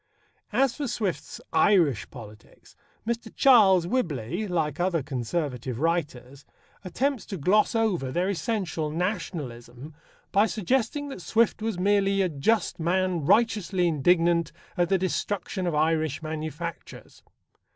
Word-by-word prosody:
As 270 -2 +2
for 290 -2 -2
Swift's 215 -6 -3
Irish 165 - +3
politics, 110 -5 -14 0.3
Mr. 230 0 -3
Charles 200 -10 +6
Whibley, 175 - -2
like 160 -5 -1
other 175 -4 0
Conservative 125 -2 -3
writers, 140 -5 -2 0.4
attempts 255 +7 -1
to 195 - -5
gloss 205 - +2
over 190 - 0
their 175 +6 0
essential 180 -4 -2
Nationalism 150 - -5 0.4
by 205 +2 +4
suggesting 250 - -1
that 230 - -8
Swift 225 +4 +1
was 220 -3 -2
merely 195 +1 +2
a 185 - 0
just 175 +5 0
man 175 -1 0
righteously 210 -5 +2
indignant 170 +1 +2 0.2
at 175 -1 +1
the 195 - +3
destruction 185 0 -2
of 170 - -1
Irish 155 -1 0
manufactures. 155 +1 -7
175 Hz, 120 wpm, -26 LUFS, 155-205 Hz, 0.4 s, Charles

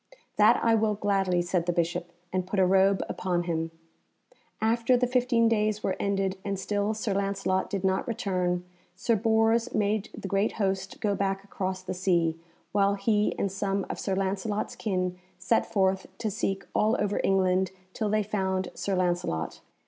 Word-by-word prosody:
"That - - +6
I 230 - +4
will 220 -1 +2
gladly," 195 -3 +1
said 175 -1 -1
the - - +3
Bishop, 175 0 -1 0.2
and 185 -1 -1
put 200 - -3
a 190 - +5
robe 190 +1 +4
upon 175 -2 -1
him. 165 -1 -2 0.9
After 230 +3 +3
the 250 - +2
fifteen 245 -2 +2
days 215 -1 +1
were 190 - 0
ended, 195 -1 0
and 200 -1 -2
still 205 +2 -1
Sir 215 -1 -1
Lancelot 195 -1 0
did 195 -2 -3
not 190 0 +1
return, 185 -6 -1 0.3
Sir 230 +5 +1
Bors 225 +2 +2
made 210 0 0
the - - -5
great 195 +3 +1
host 195 -2 -2
go 205 -1 +1
back 195 -1 -1
across 190 -2 -4
the 185 - -4
sea, 175 -3 +1 0.4
while 200 0 +3
he 210 +1 +1
and 200 - -1
some 195 0 -1
of - - -6
Sir 195 - -1
Lancelot's 195 +2 -2
kin 185 -3 -2 0.2
set 190 +5 +1
forth 190 -1 +1
to 215 - -2
seek 195 0 -2
all 220 +3 +2
over 205 0 0
England 190 -1 +2 0.2
till 215 -2 -1
they 215 0 +2
found 190 -3 -1
Sir 195 - -2
Lancelot. 175 - -1
195 Hz, 170 wpm, -28 LUFS, 185-210 Hz, 0.9 s, That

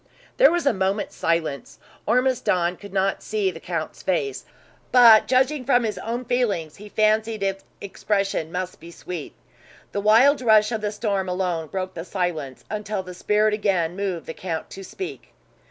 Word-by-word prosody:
There - - +7
was 345 -1 -1
a 280 - +4
moment's 195 +1 -1
silence. 160 -4 -2 0.3
Ormiston 230 -8 +1
could 200 -1 -11
not 195 0 0
see 205 -3 -1
the 165 - -10
count's 165 -2 -5
face; 145 -8 -2 0.5
but, 235 -4 +8
judging 265 +2 +2
from 245 -1 +3
his 215 -2 -2
own 240 +2 -4
feelings, 220 -11 -1
he 210 +1 -11
fancied 215 0 +1
its 195 0 -2 0.2
expression 195 -4 -2
must 185 +1 -4
be 165 - -12
sweet. 170 -2 -7 0.6
The 200 - -2
wild 240 +7 +5
rush 220 -2 +4
of 220 -2 -2
the 210 -1 -1
storm 200 -3 -2
alone 180 -3 -2
broke 185 +2 -4
the 165 - -6
silence, 170 -8 -4
until 210 -2 -3
the 180 0 -9
spirit 210 +4 +1
again 185 -5 0
moved 190 -4 -3
the 160 - -6
count 165 -3 -5
to 195 - -8
speak. 380 - -8
200 Hz, 170 wpm, -23 LUFS, 180-220 Hz, 0.6 s, but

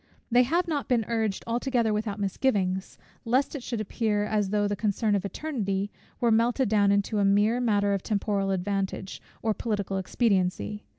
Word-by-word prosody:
They 245 +1 +6
have 340 +8 +1
not 300 -4 -2
been 235 -4 +2
urged 220 -4 -1
altogether 235 -1 0
without 210 -1 -2
misgivings, 195 -2 0 0.3
lest 255 +4 +1
it 285 - -4
should 235 -2 -4
appear, 210 0 0
as 210 -2 0
though 205 0 +1
the 205 - -1
concern 210 +1 0
of 200 -1 0
Eternity 205 -6 -2 0.3
were 235 -2 +2
melted 235 +2 +2
down 205 -2 +4
into 200 +1 +1
a - - +3
mere 205 +4 +3
matter 205 -4 +2
of 195 - -1
temporal 200 -1 -1
advantage, 195 0 -2 0.2
or 220 -1 +2
political 200 -4 -2
expediency. 200 0 0
210 Hz, 170 wpm, -27 LUFS, 200-235 Hz, 0.3 s, They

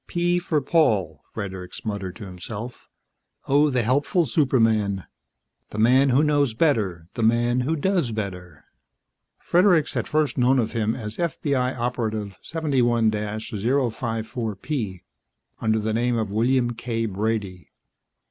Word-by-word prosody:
"P 175 0 +1
for 160 -4 0
Paul," 105 - +1
Fredericks 95 -3 -7
muttered 100 -4 -4
to 110 - -8
himself. 100 +6 -8 0.6
"Oh, 145 +2 +4
the 125 -3 +1
helpful 145 - +2
superman, 110 - +2 0.6
the - - -8
man 130 +5 +5
who 130 +4 +4
knows 145 -6 +2
better, 105 - +1
the - - -4
man 120 +2 +2
who 140 +6 0
does 170 -5 0
better." 90 -6 -6 0.7
Fredericks 175 -4 +3
had - - -2
first 150 -3 0
known 125 +2 +4
of 115 -3 0
him 110 -1 0
as 110 -3 -6
FBI 140 -7 -1
Operative 110 -5 -2
71 125 -8 +1
054P, 110 - -2 0.6
under 110 0 +1
the 110 0 -1
name 120 +1 +1
of 110 -3 -2
William 120 +3 +2
K. 115 -1 -3
Brady. 100 -3 -3
115 Hz, 130 wpm, -24 LUFS, 105-135 Hz, 0.7 s, man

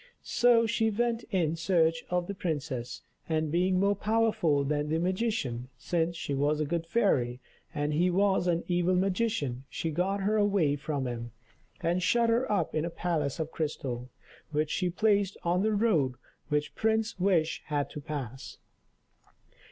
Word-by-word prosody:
So 240 -1 +4
she 225 0 +1
went 230 +2 -1
in 170 -6 +1
search 165 -1 +2
of 180 -1 0
the 200 - -4
princess, 145 -9 -4 0.3
and 155 -1 0
being 180 +2 +2
more 200 +1 +3
powerful 215 -8 +2
than 150 +1 -1
the 160 - +1
magician, 180 - -1
since 170 -1 -1
she 145 - -3
was 145 +2 +1
a 155 - +1
good 165 +2 -2
fairy, 135 - +1 0.3
and 150 -2 -1
he 175 +4 +3
was 190 0 +2
an 170 -1 +1
evil 175 +1 +2
magician, 185 - 0
she 165 - -3
got 190 +5 0
her 210 +3 +1
away 200 -8 +2
from 145 -1 -3
him, 120 -2 -5 0.5
and 175 +2 +1
shut 235 +5 +3
her 245 +2 +1
up 185 -6 0
in 155 - 0
a 170 - -2
palace 160 -5 -1
of 160 0 -3
crystal, 130 -5 -3 0.4
which 150 0 -1
she 180 -2 0
placed 200 +1 +1
on 175 +2 +1
the 215 +1 +1
road 165 - +2 0.3
which 150 -1 0
Prince 220 -1 0
Wish 175 -4 +2
had 145 -2 -1
to 150 - -7
pass. 135 -4 -6
170 Hz, 165 wpm, -29 LUFS, 150-200 Hz, 0.5 s, So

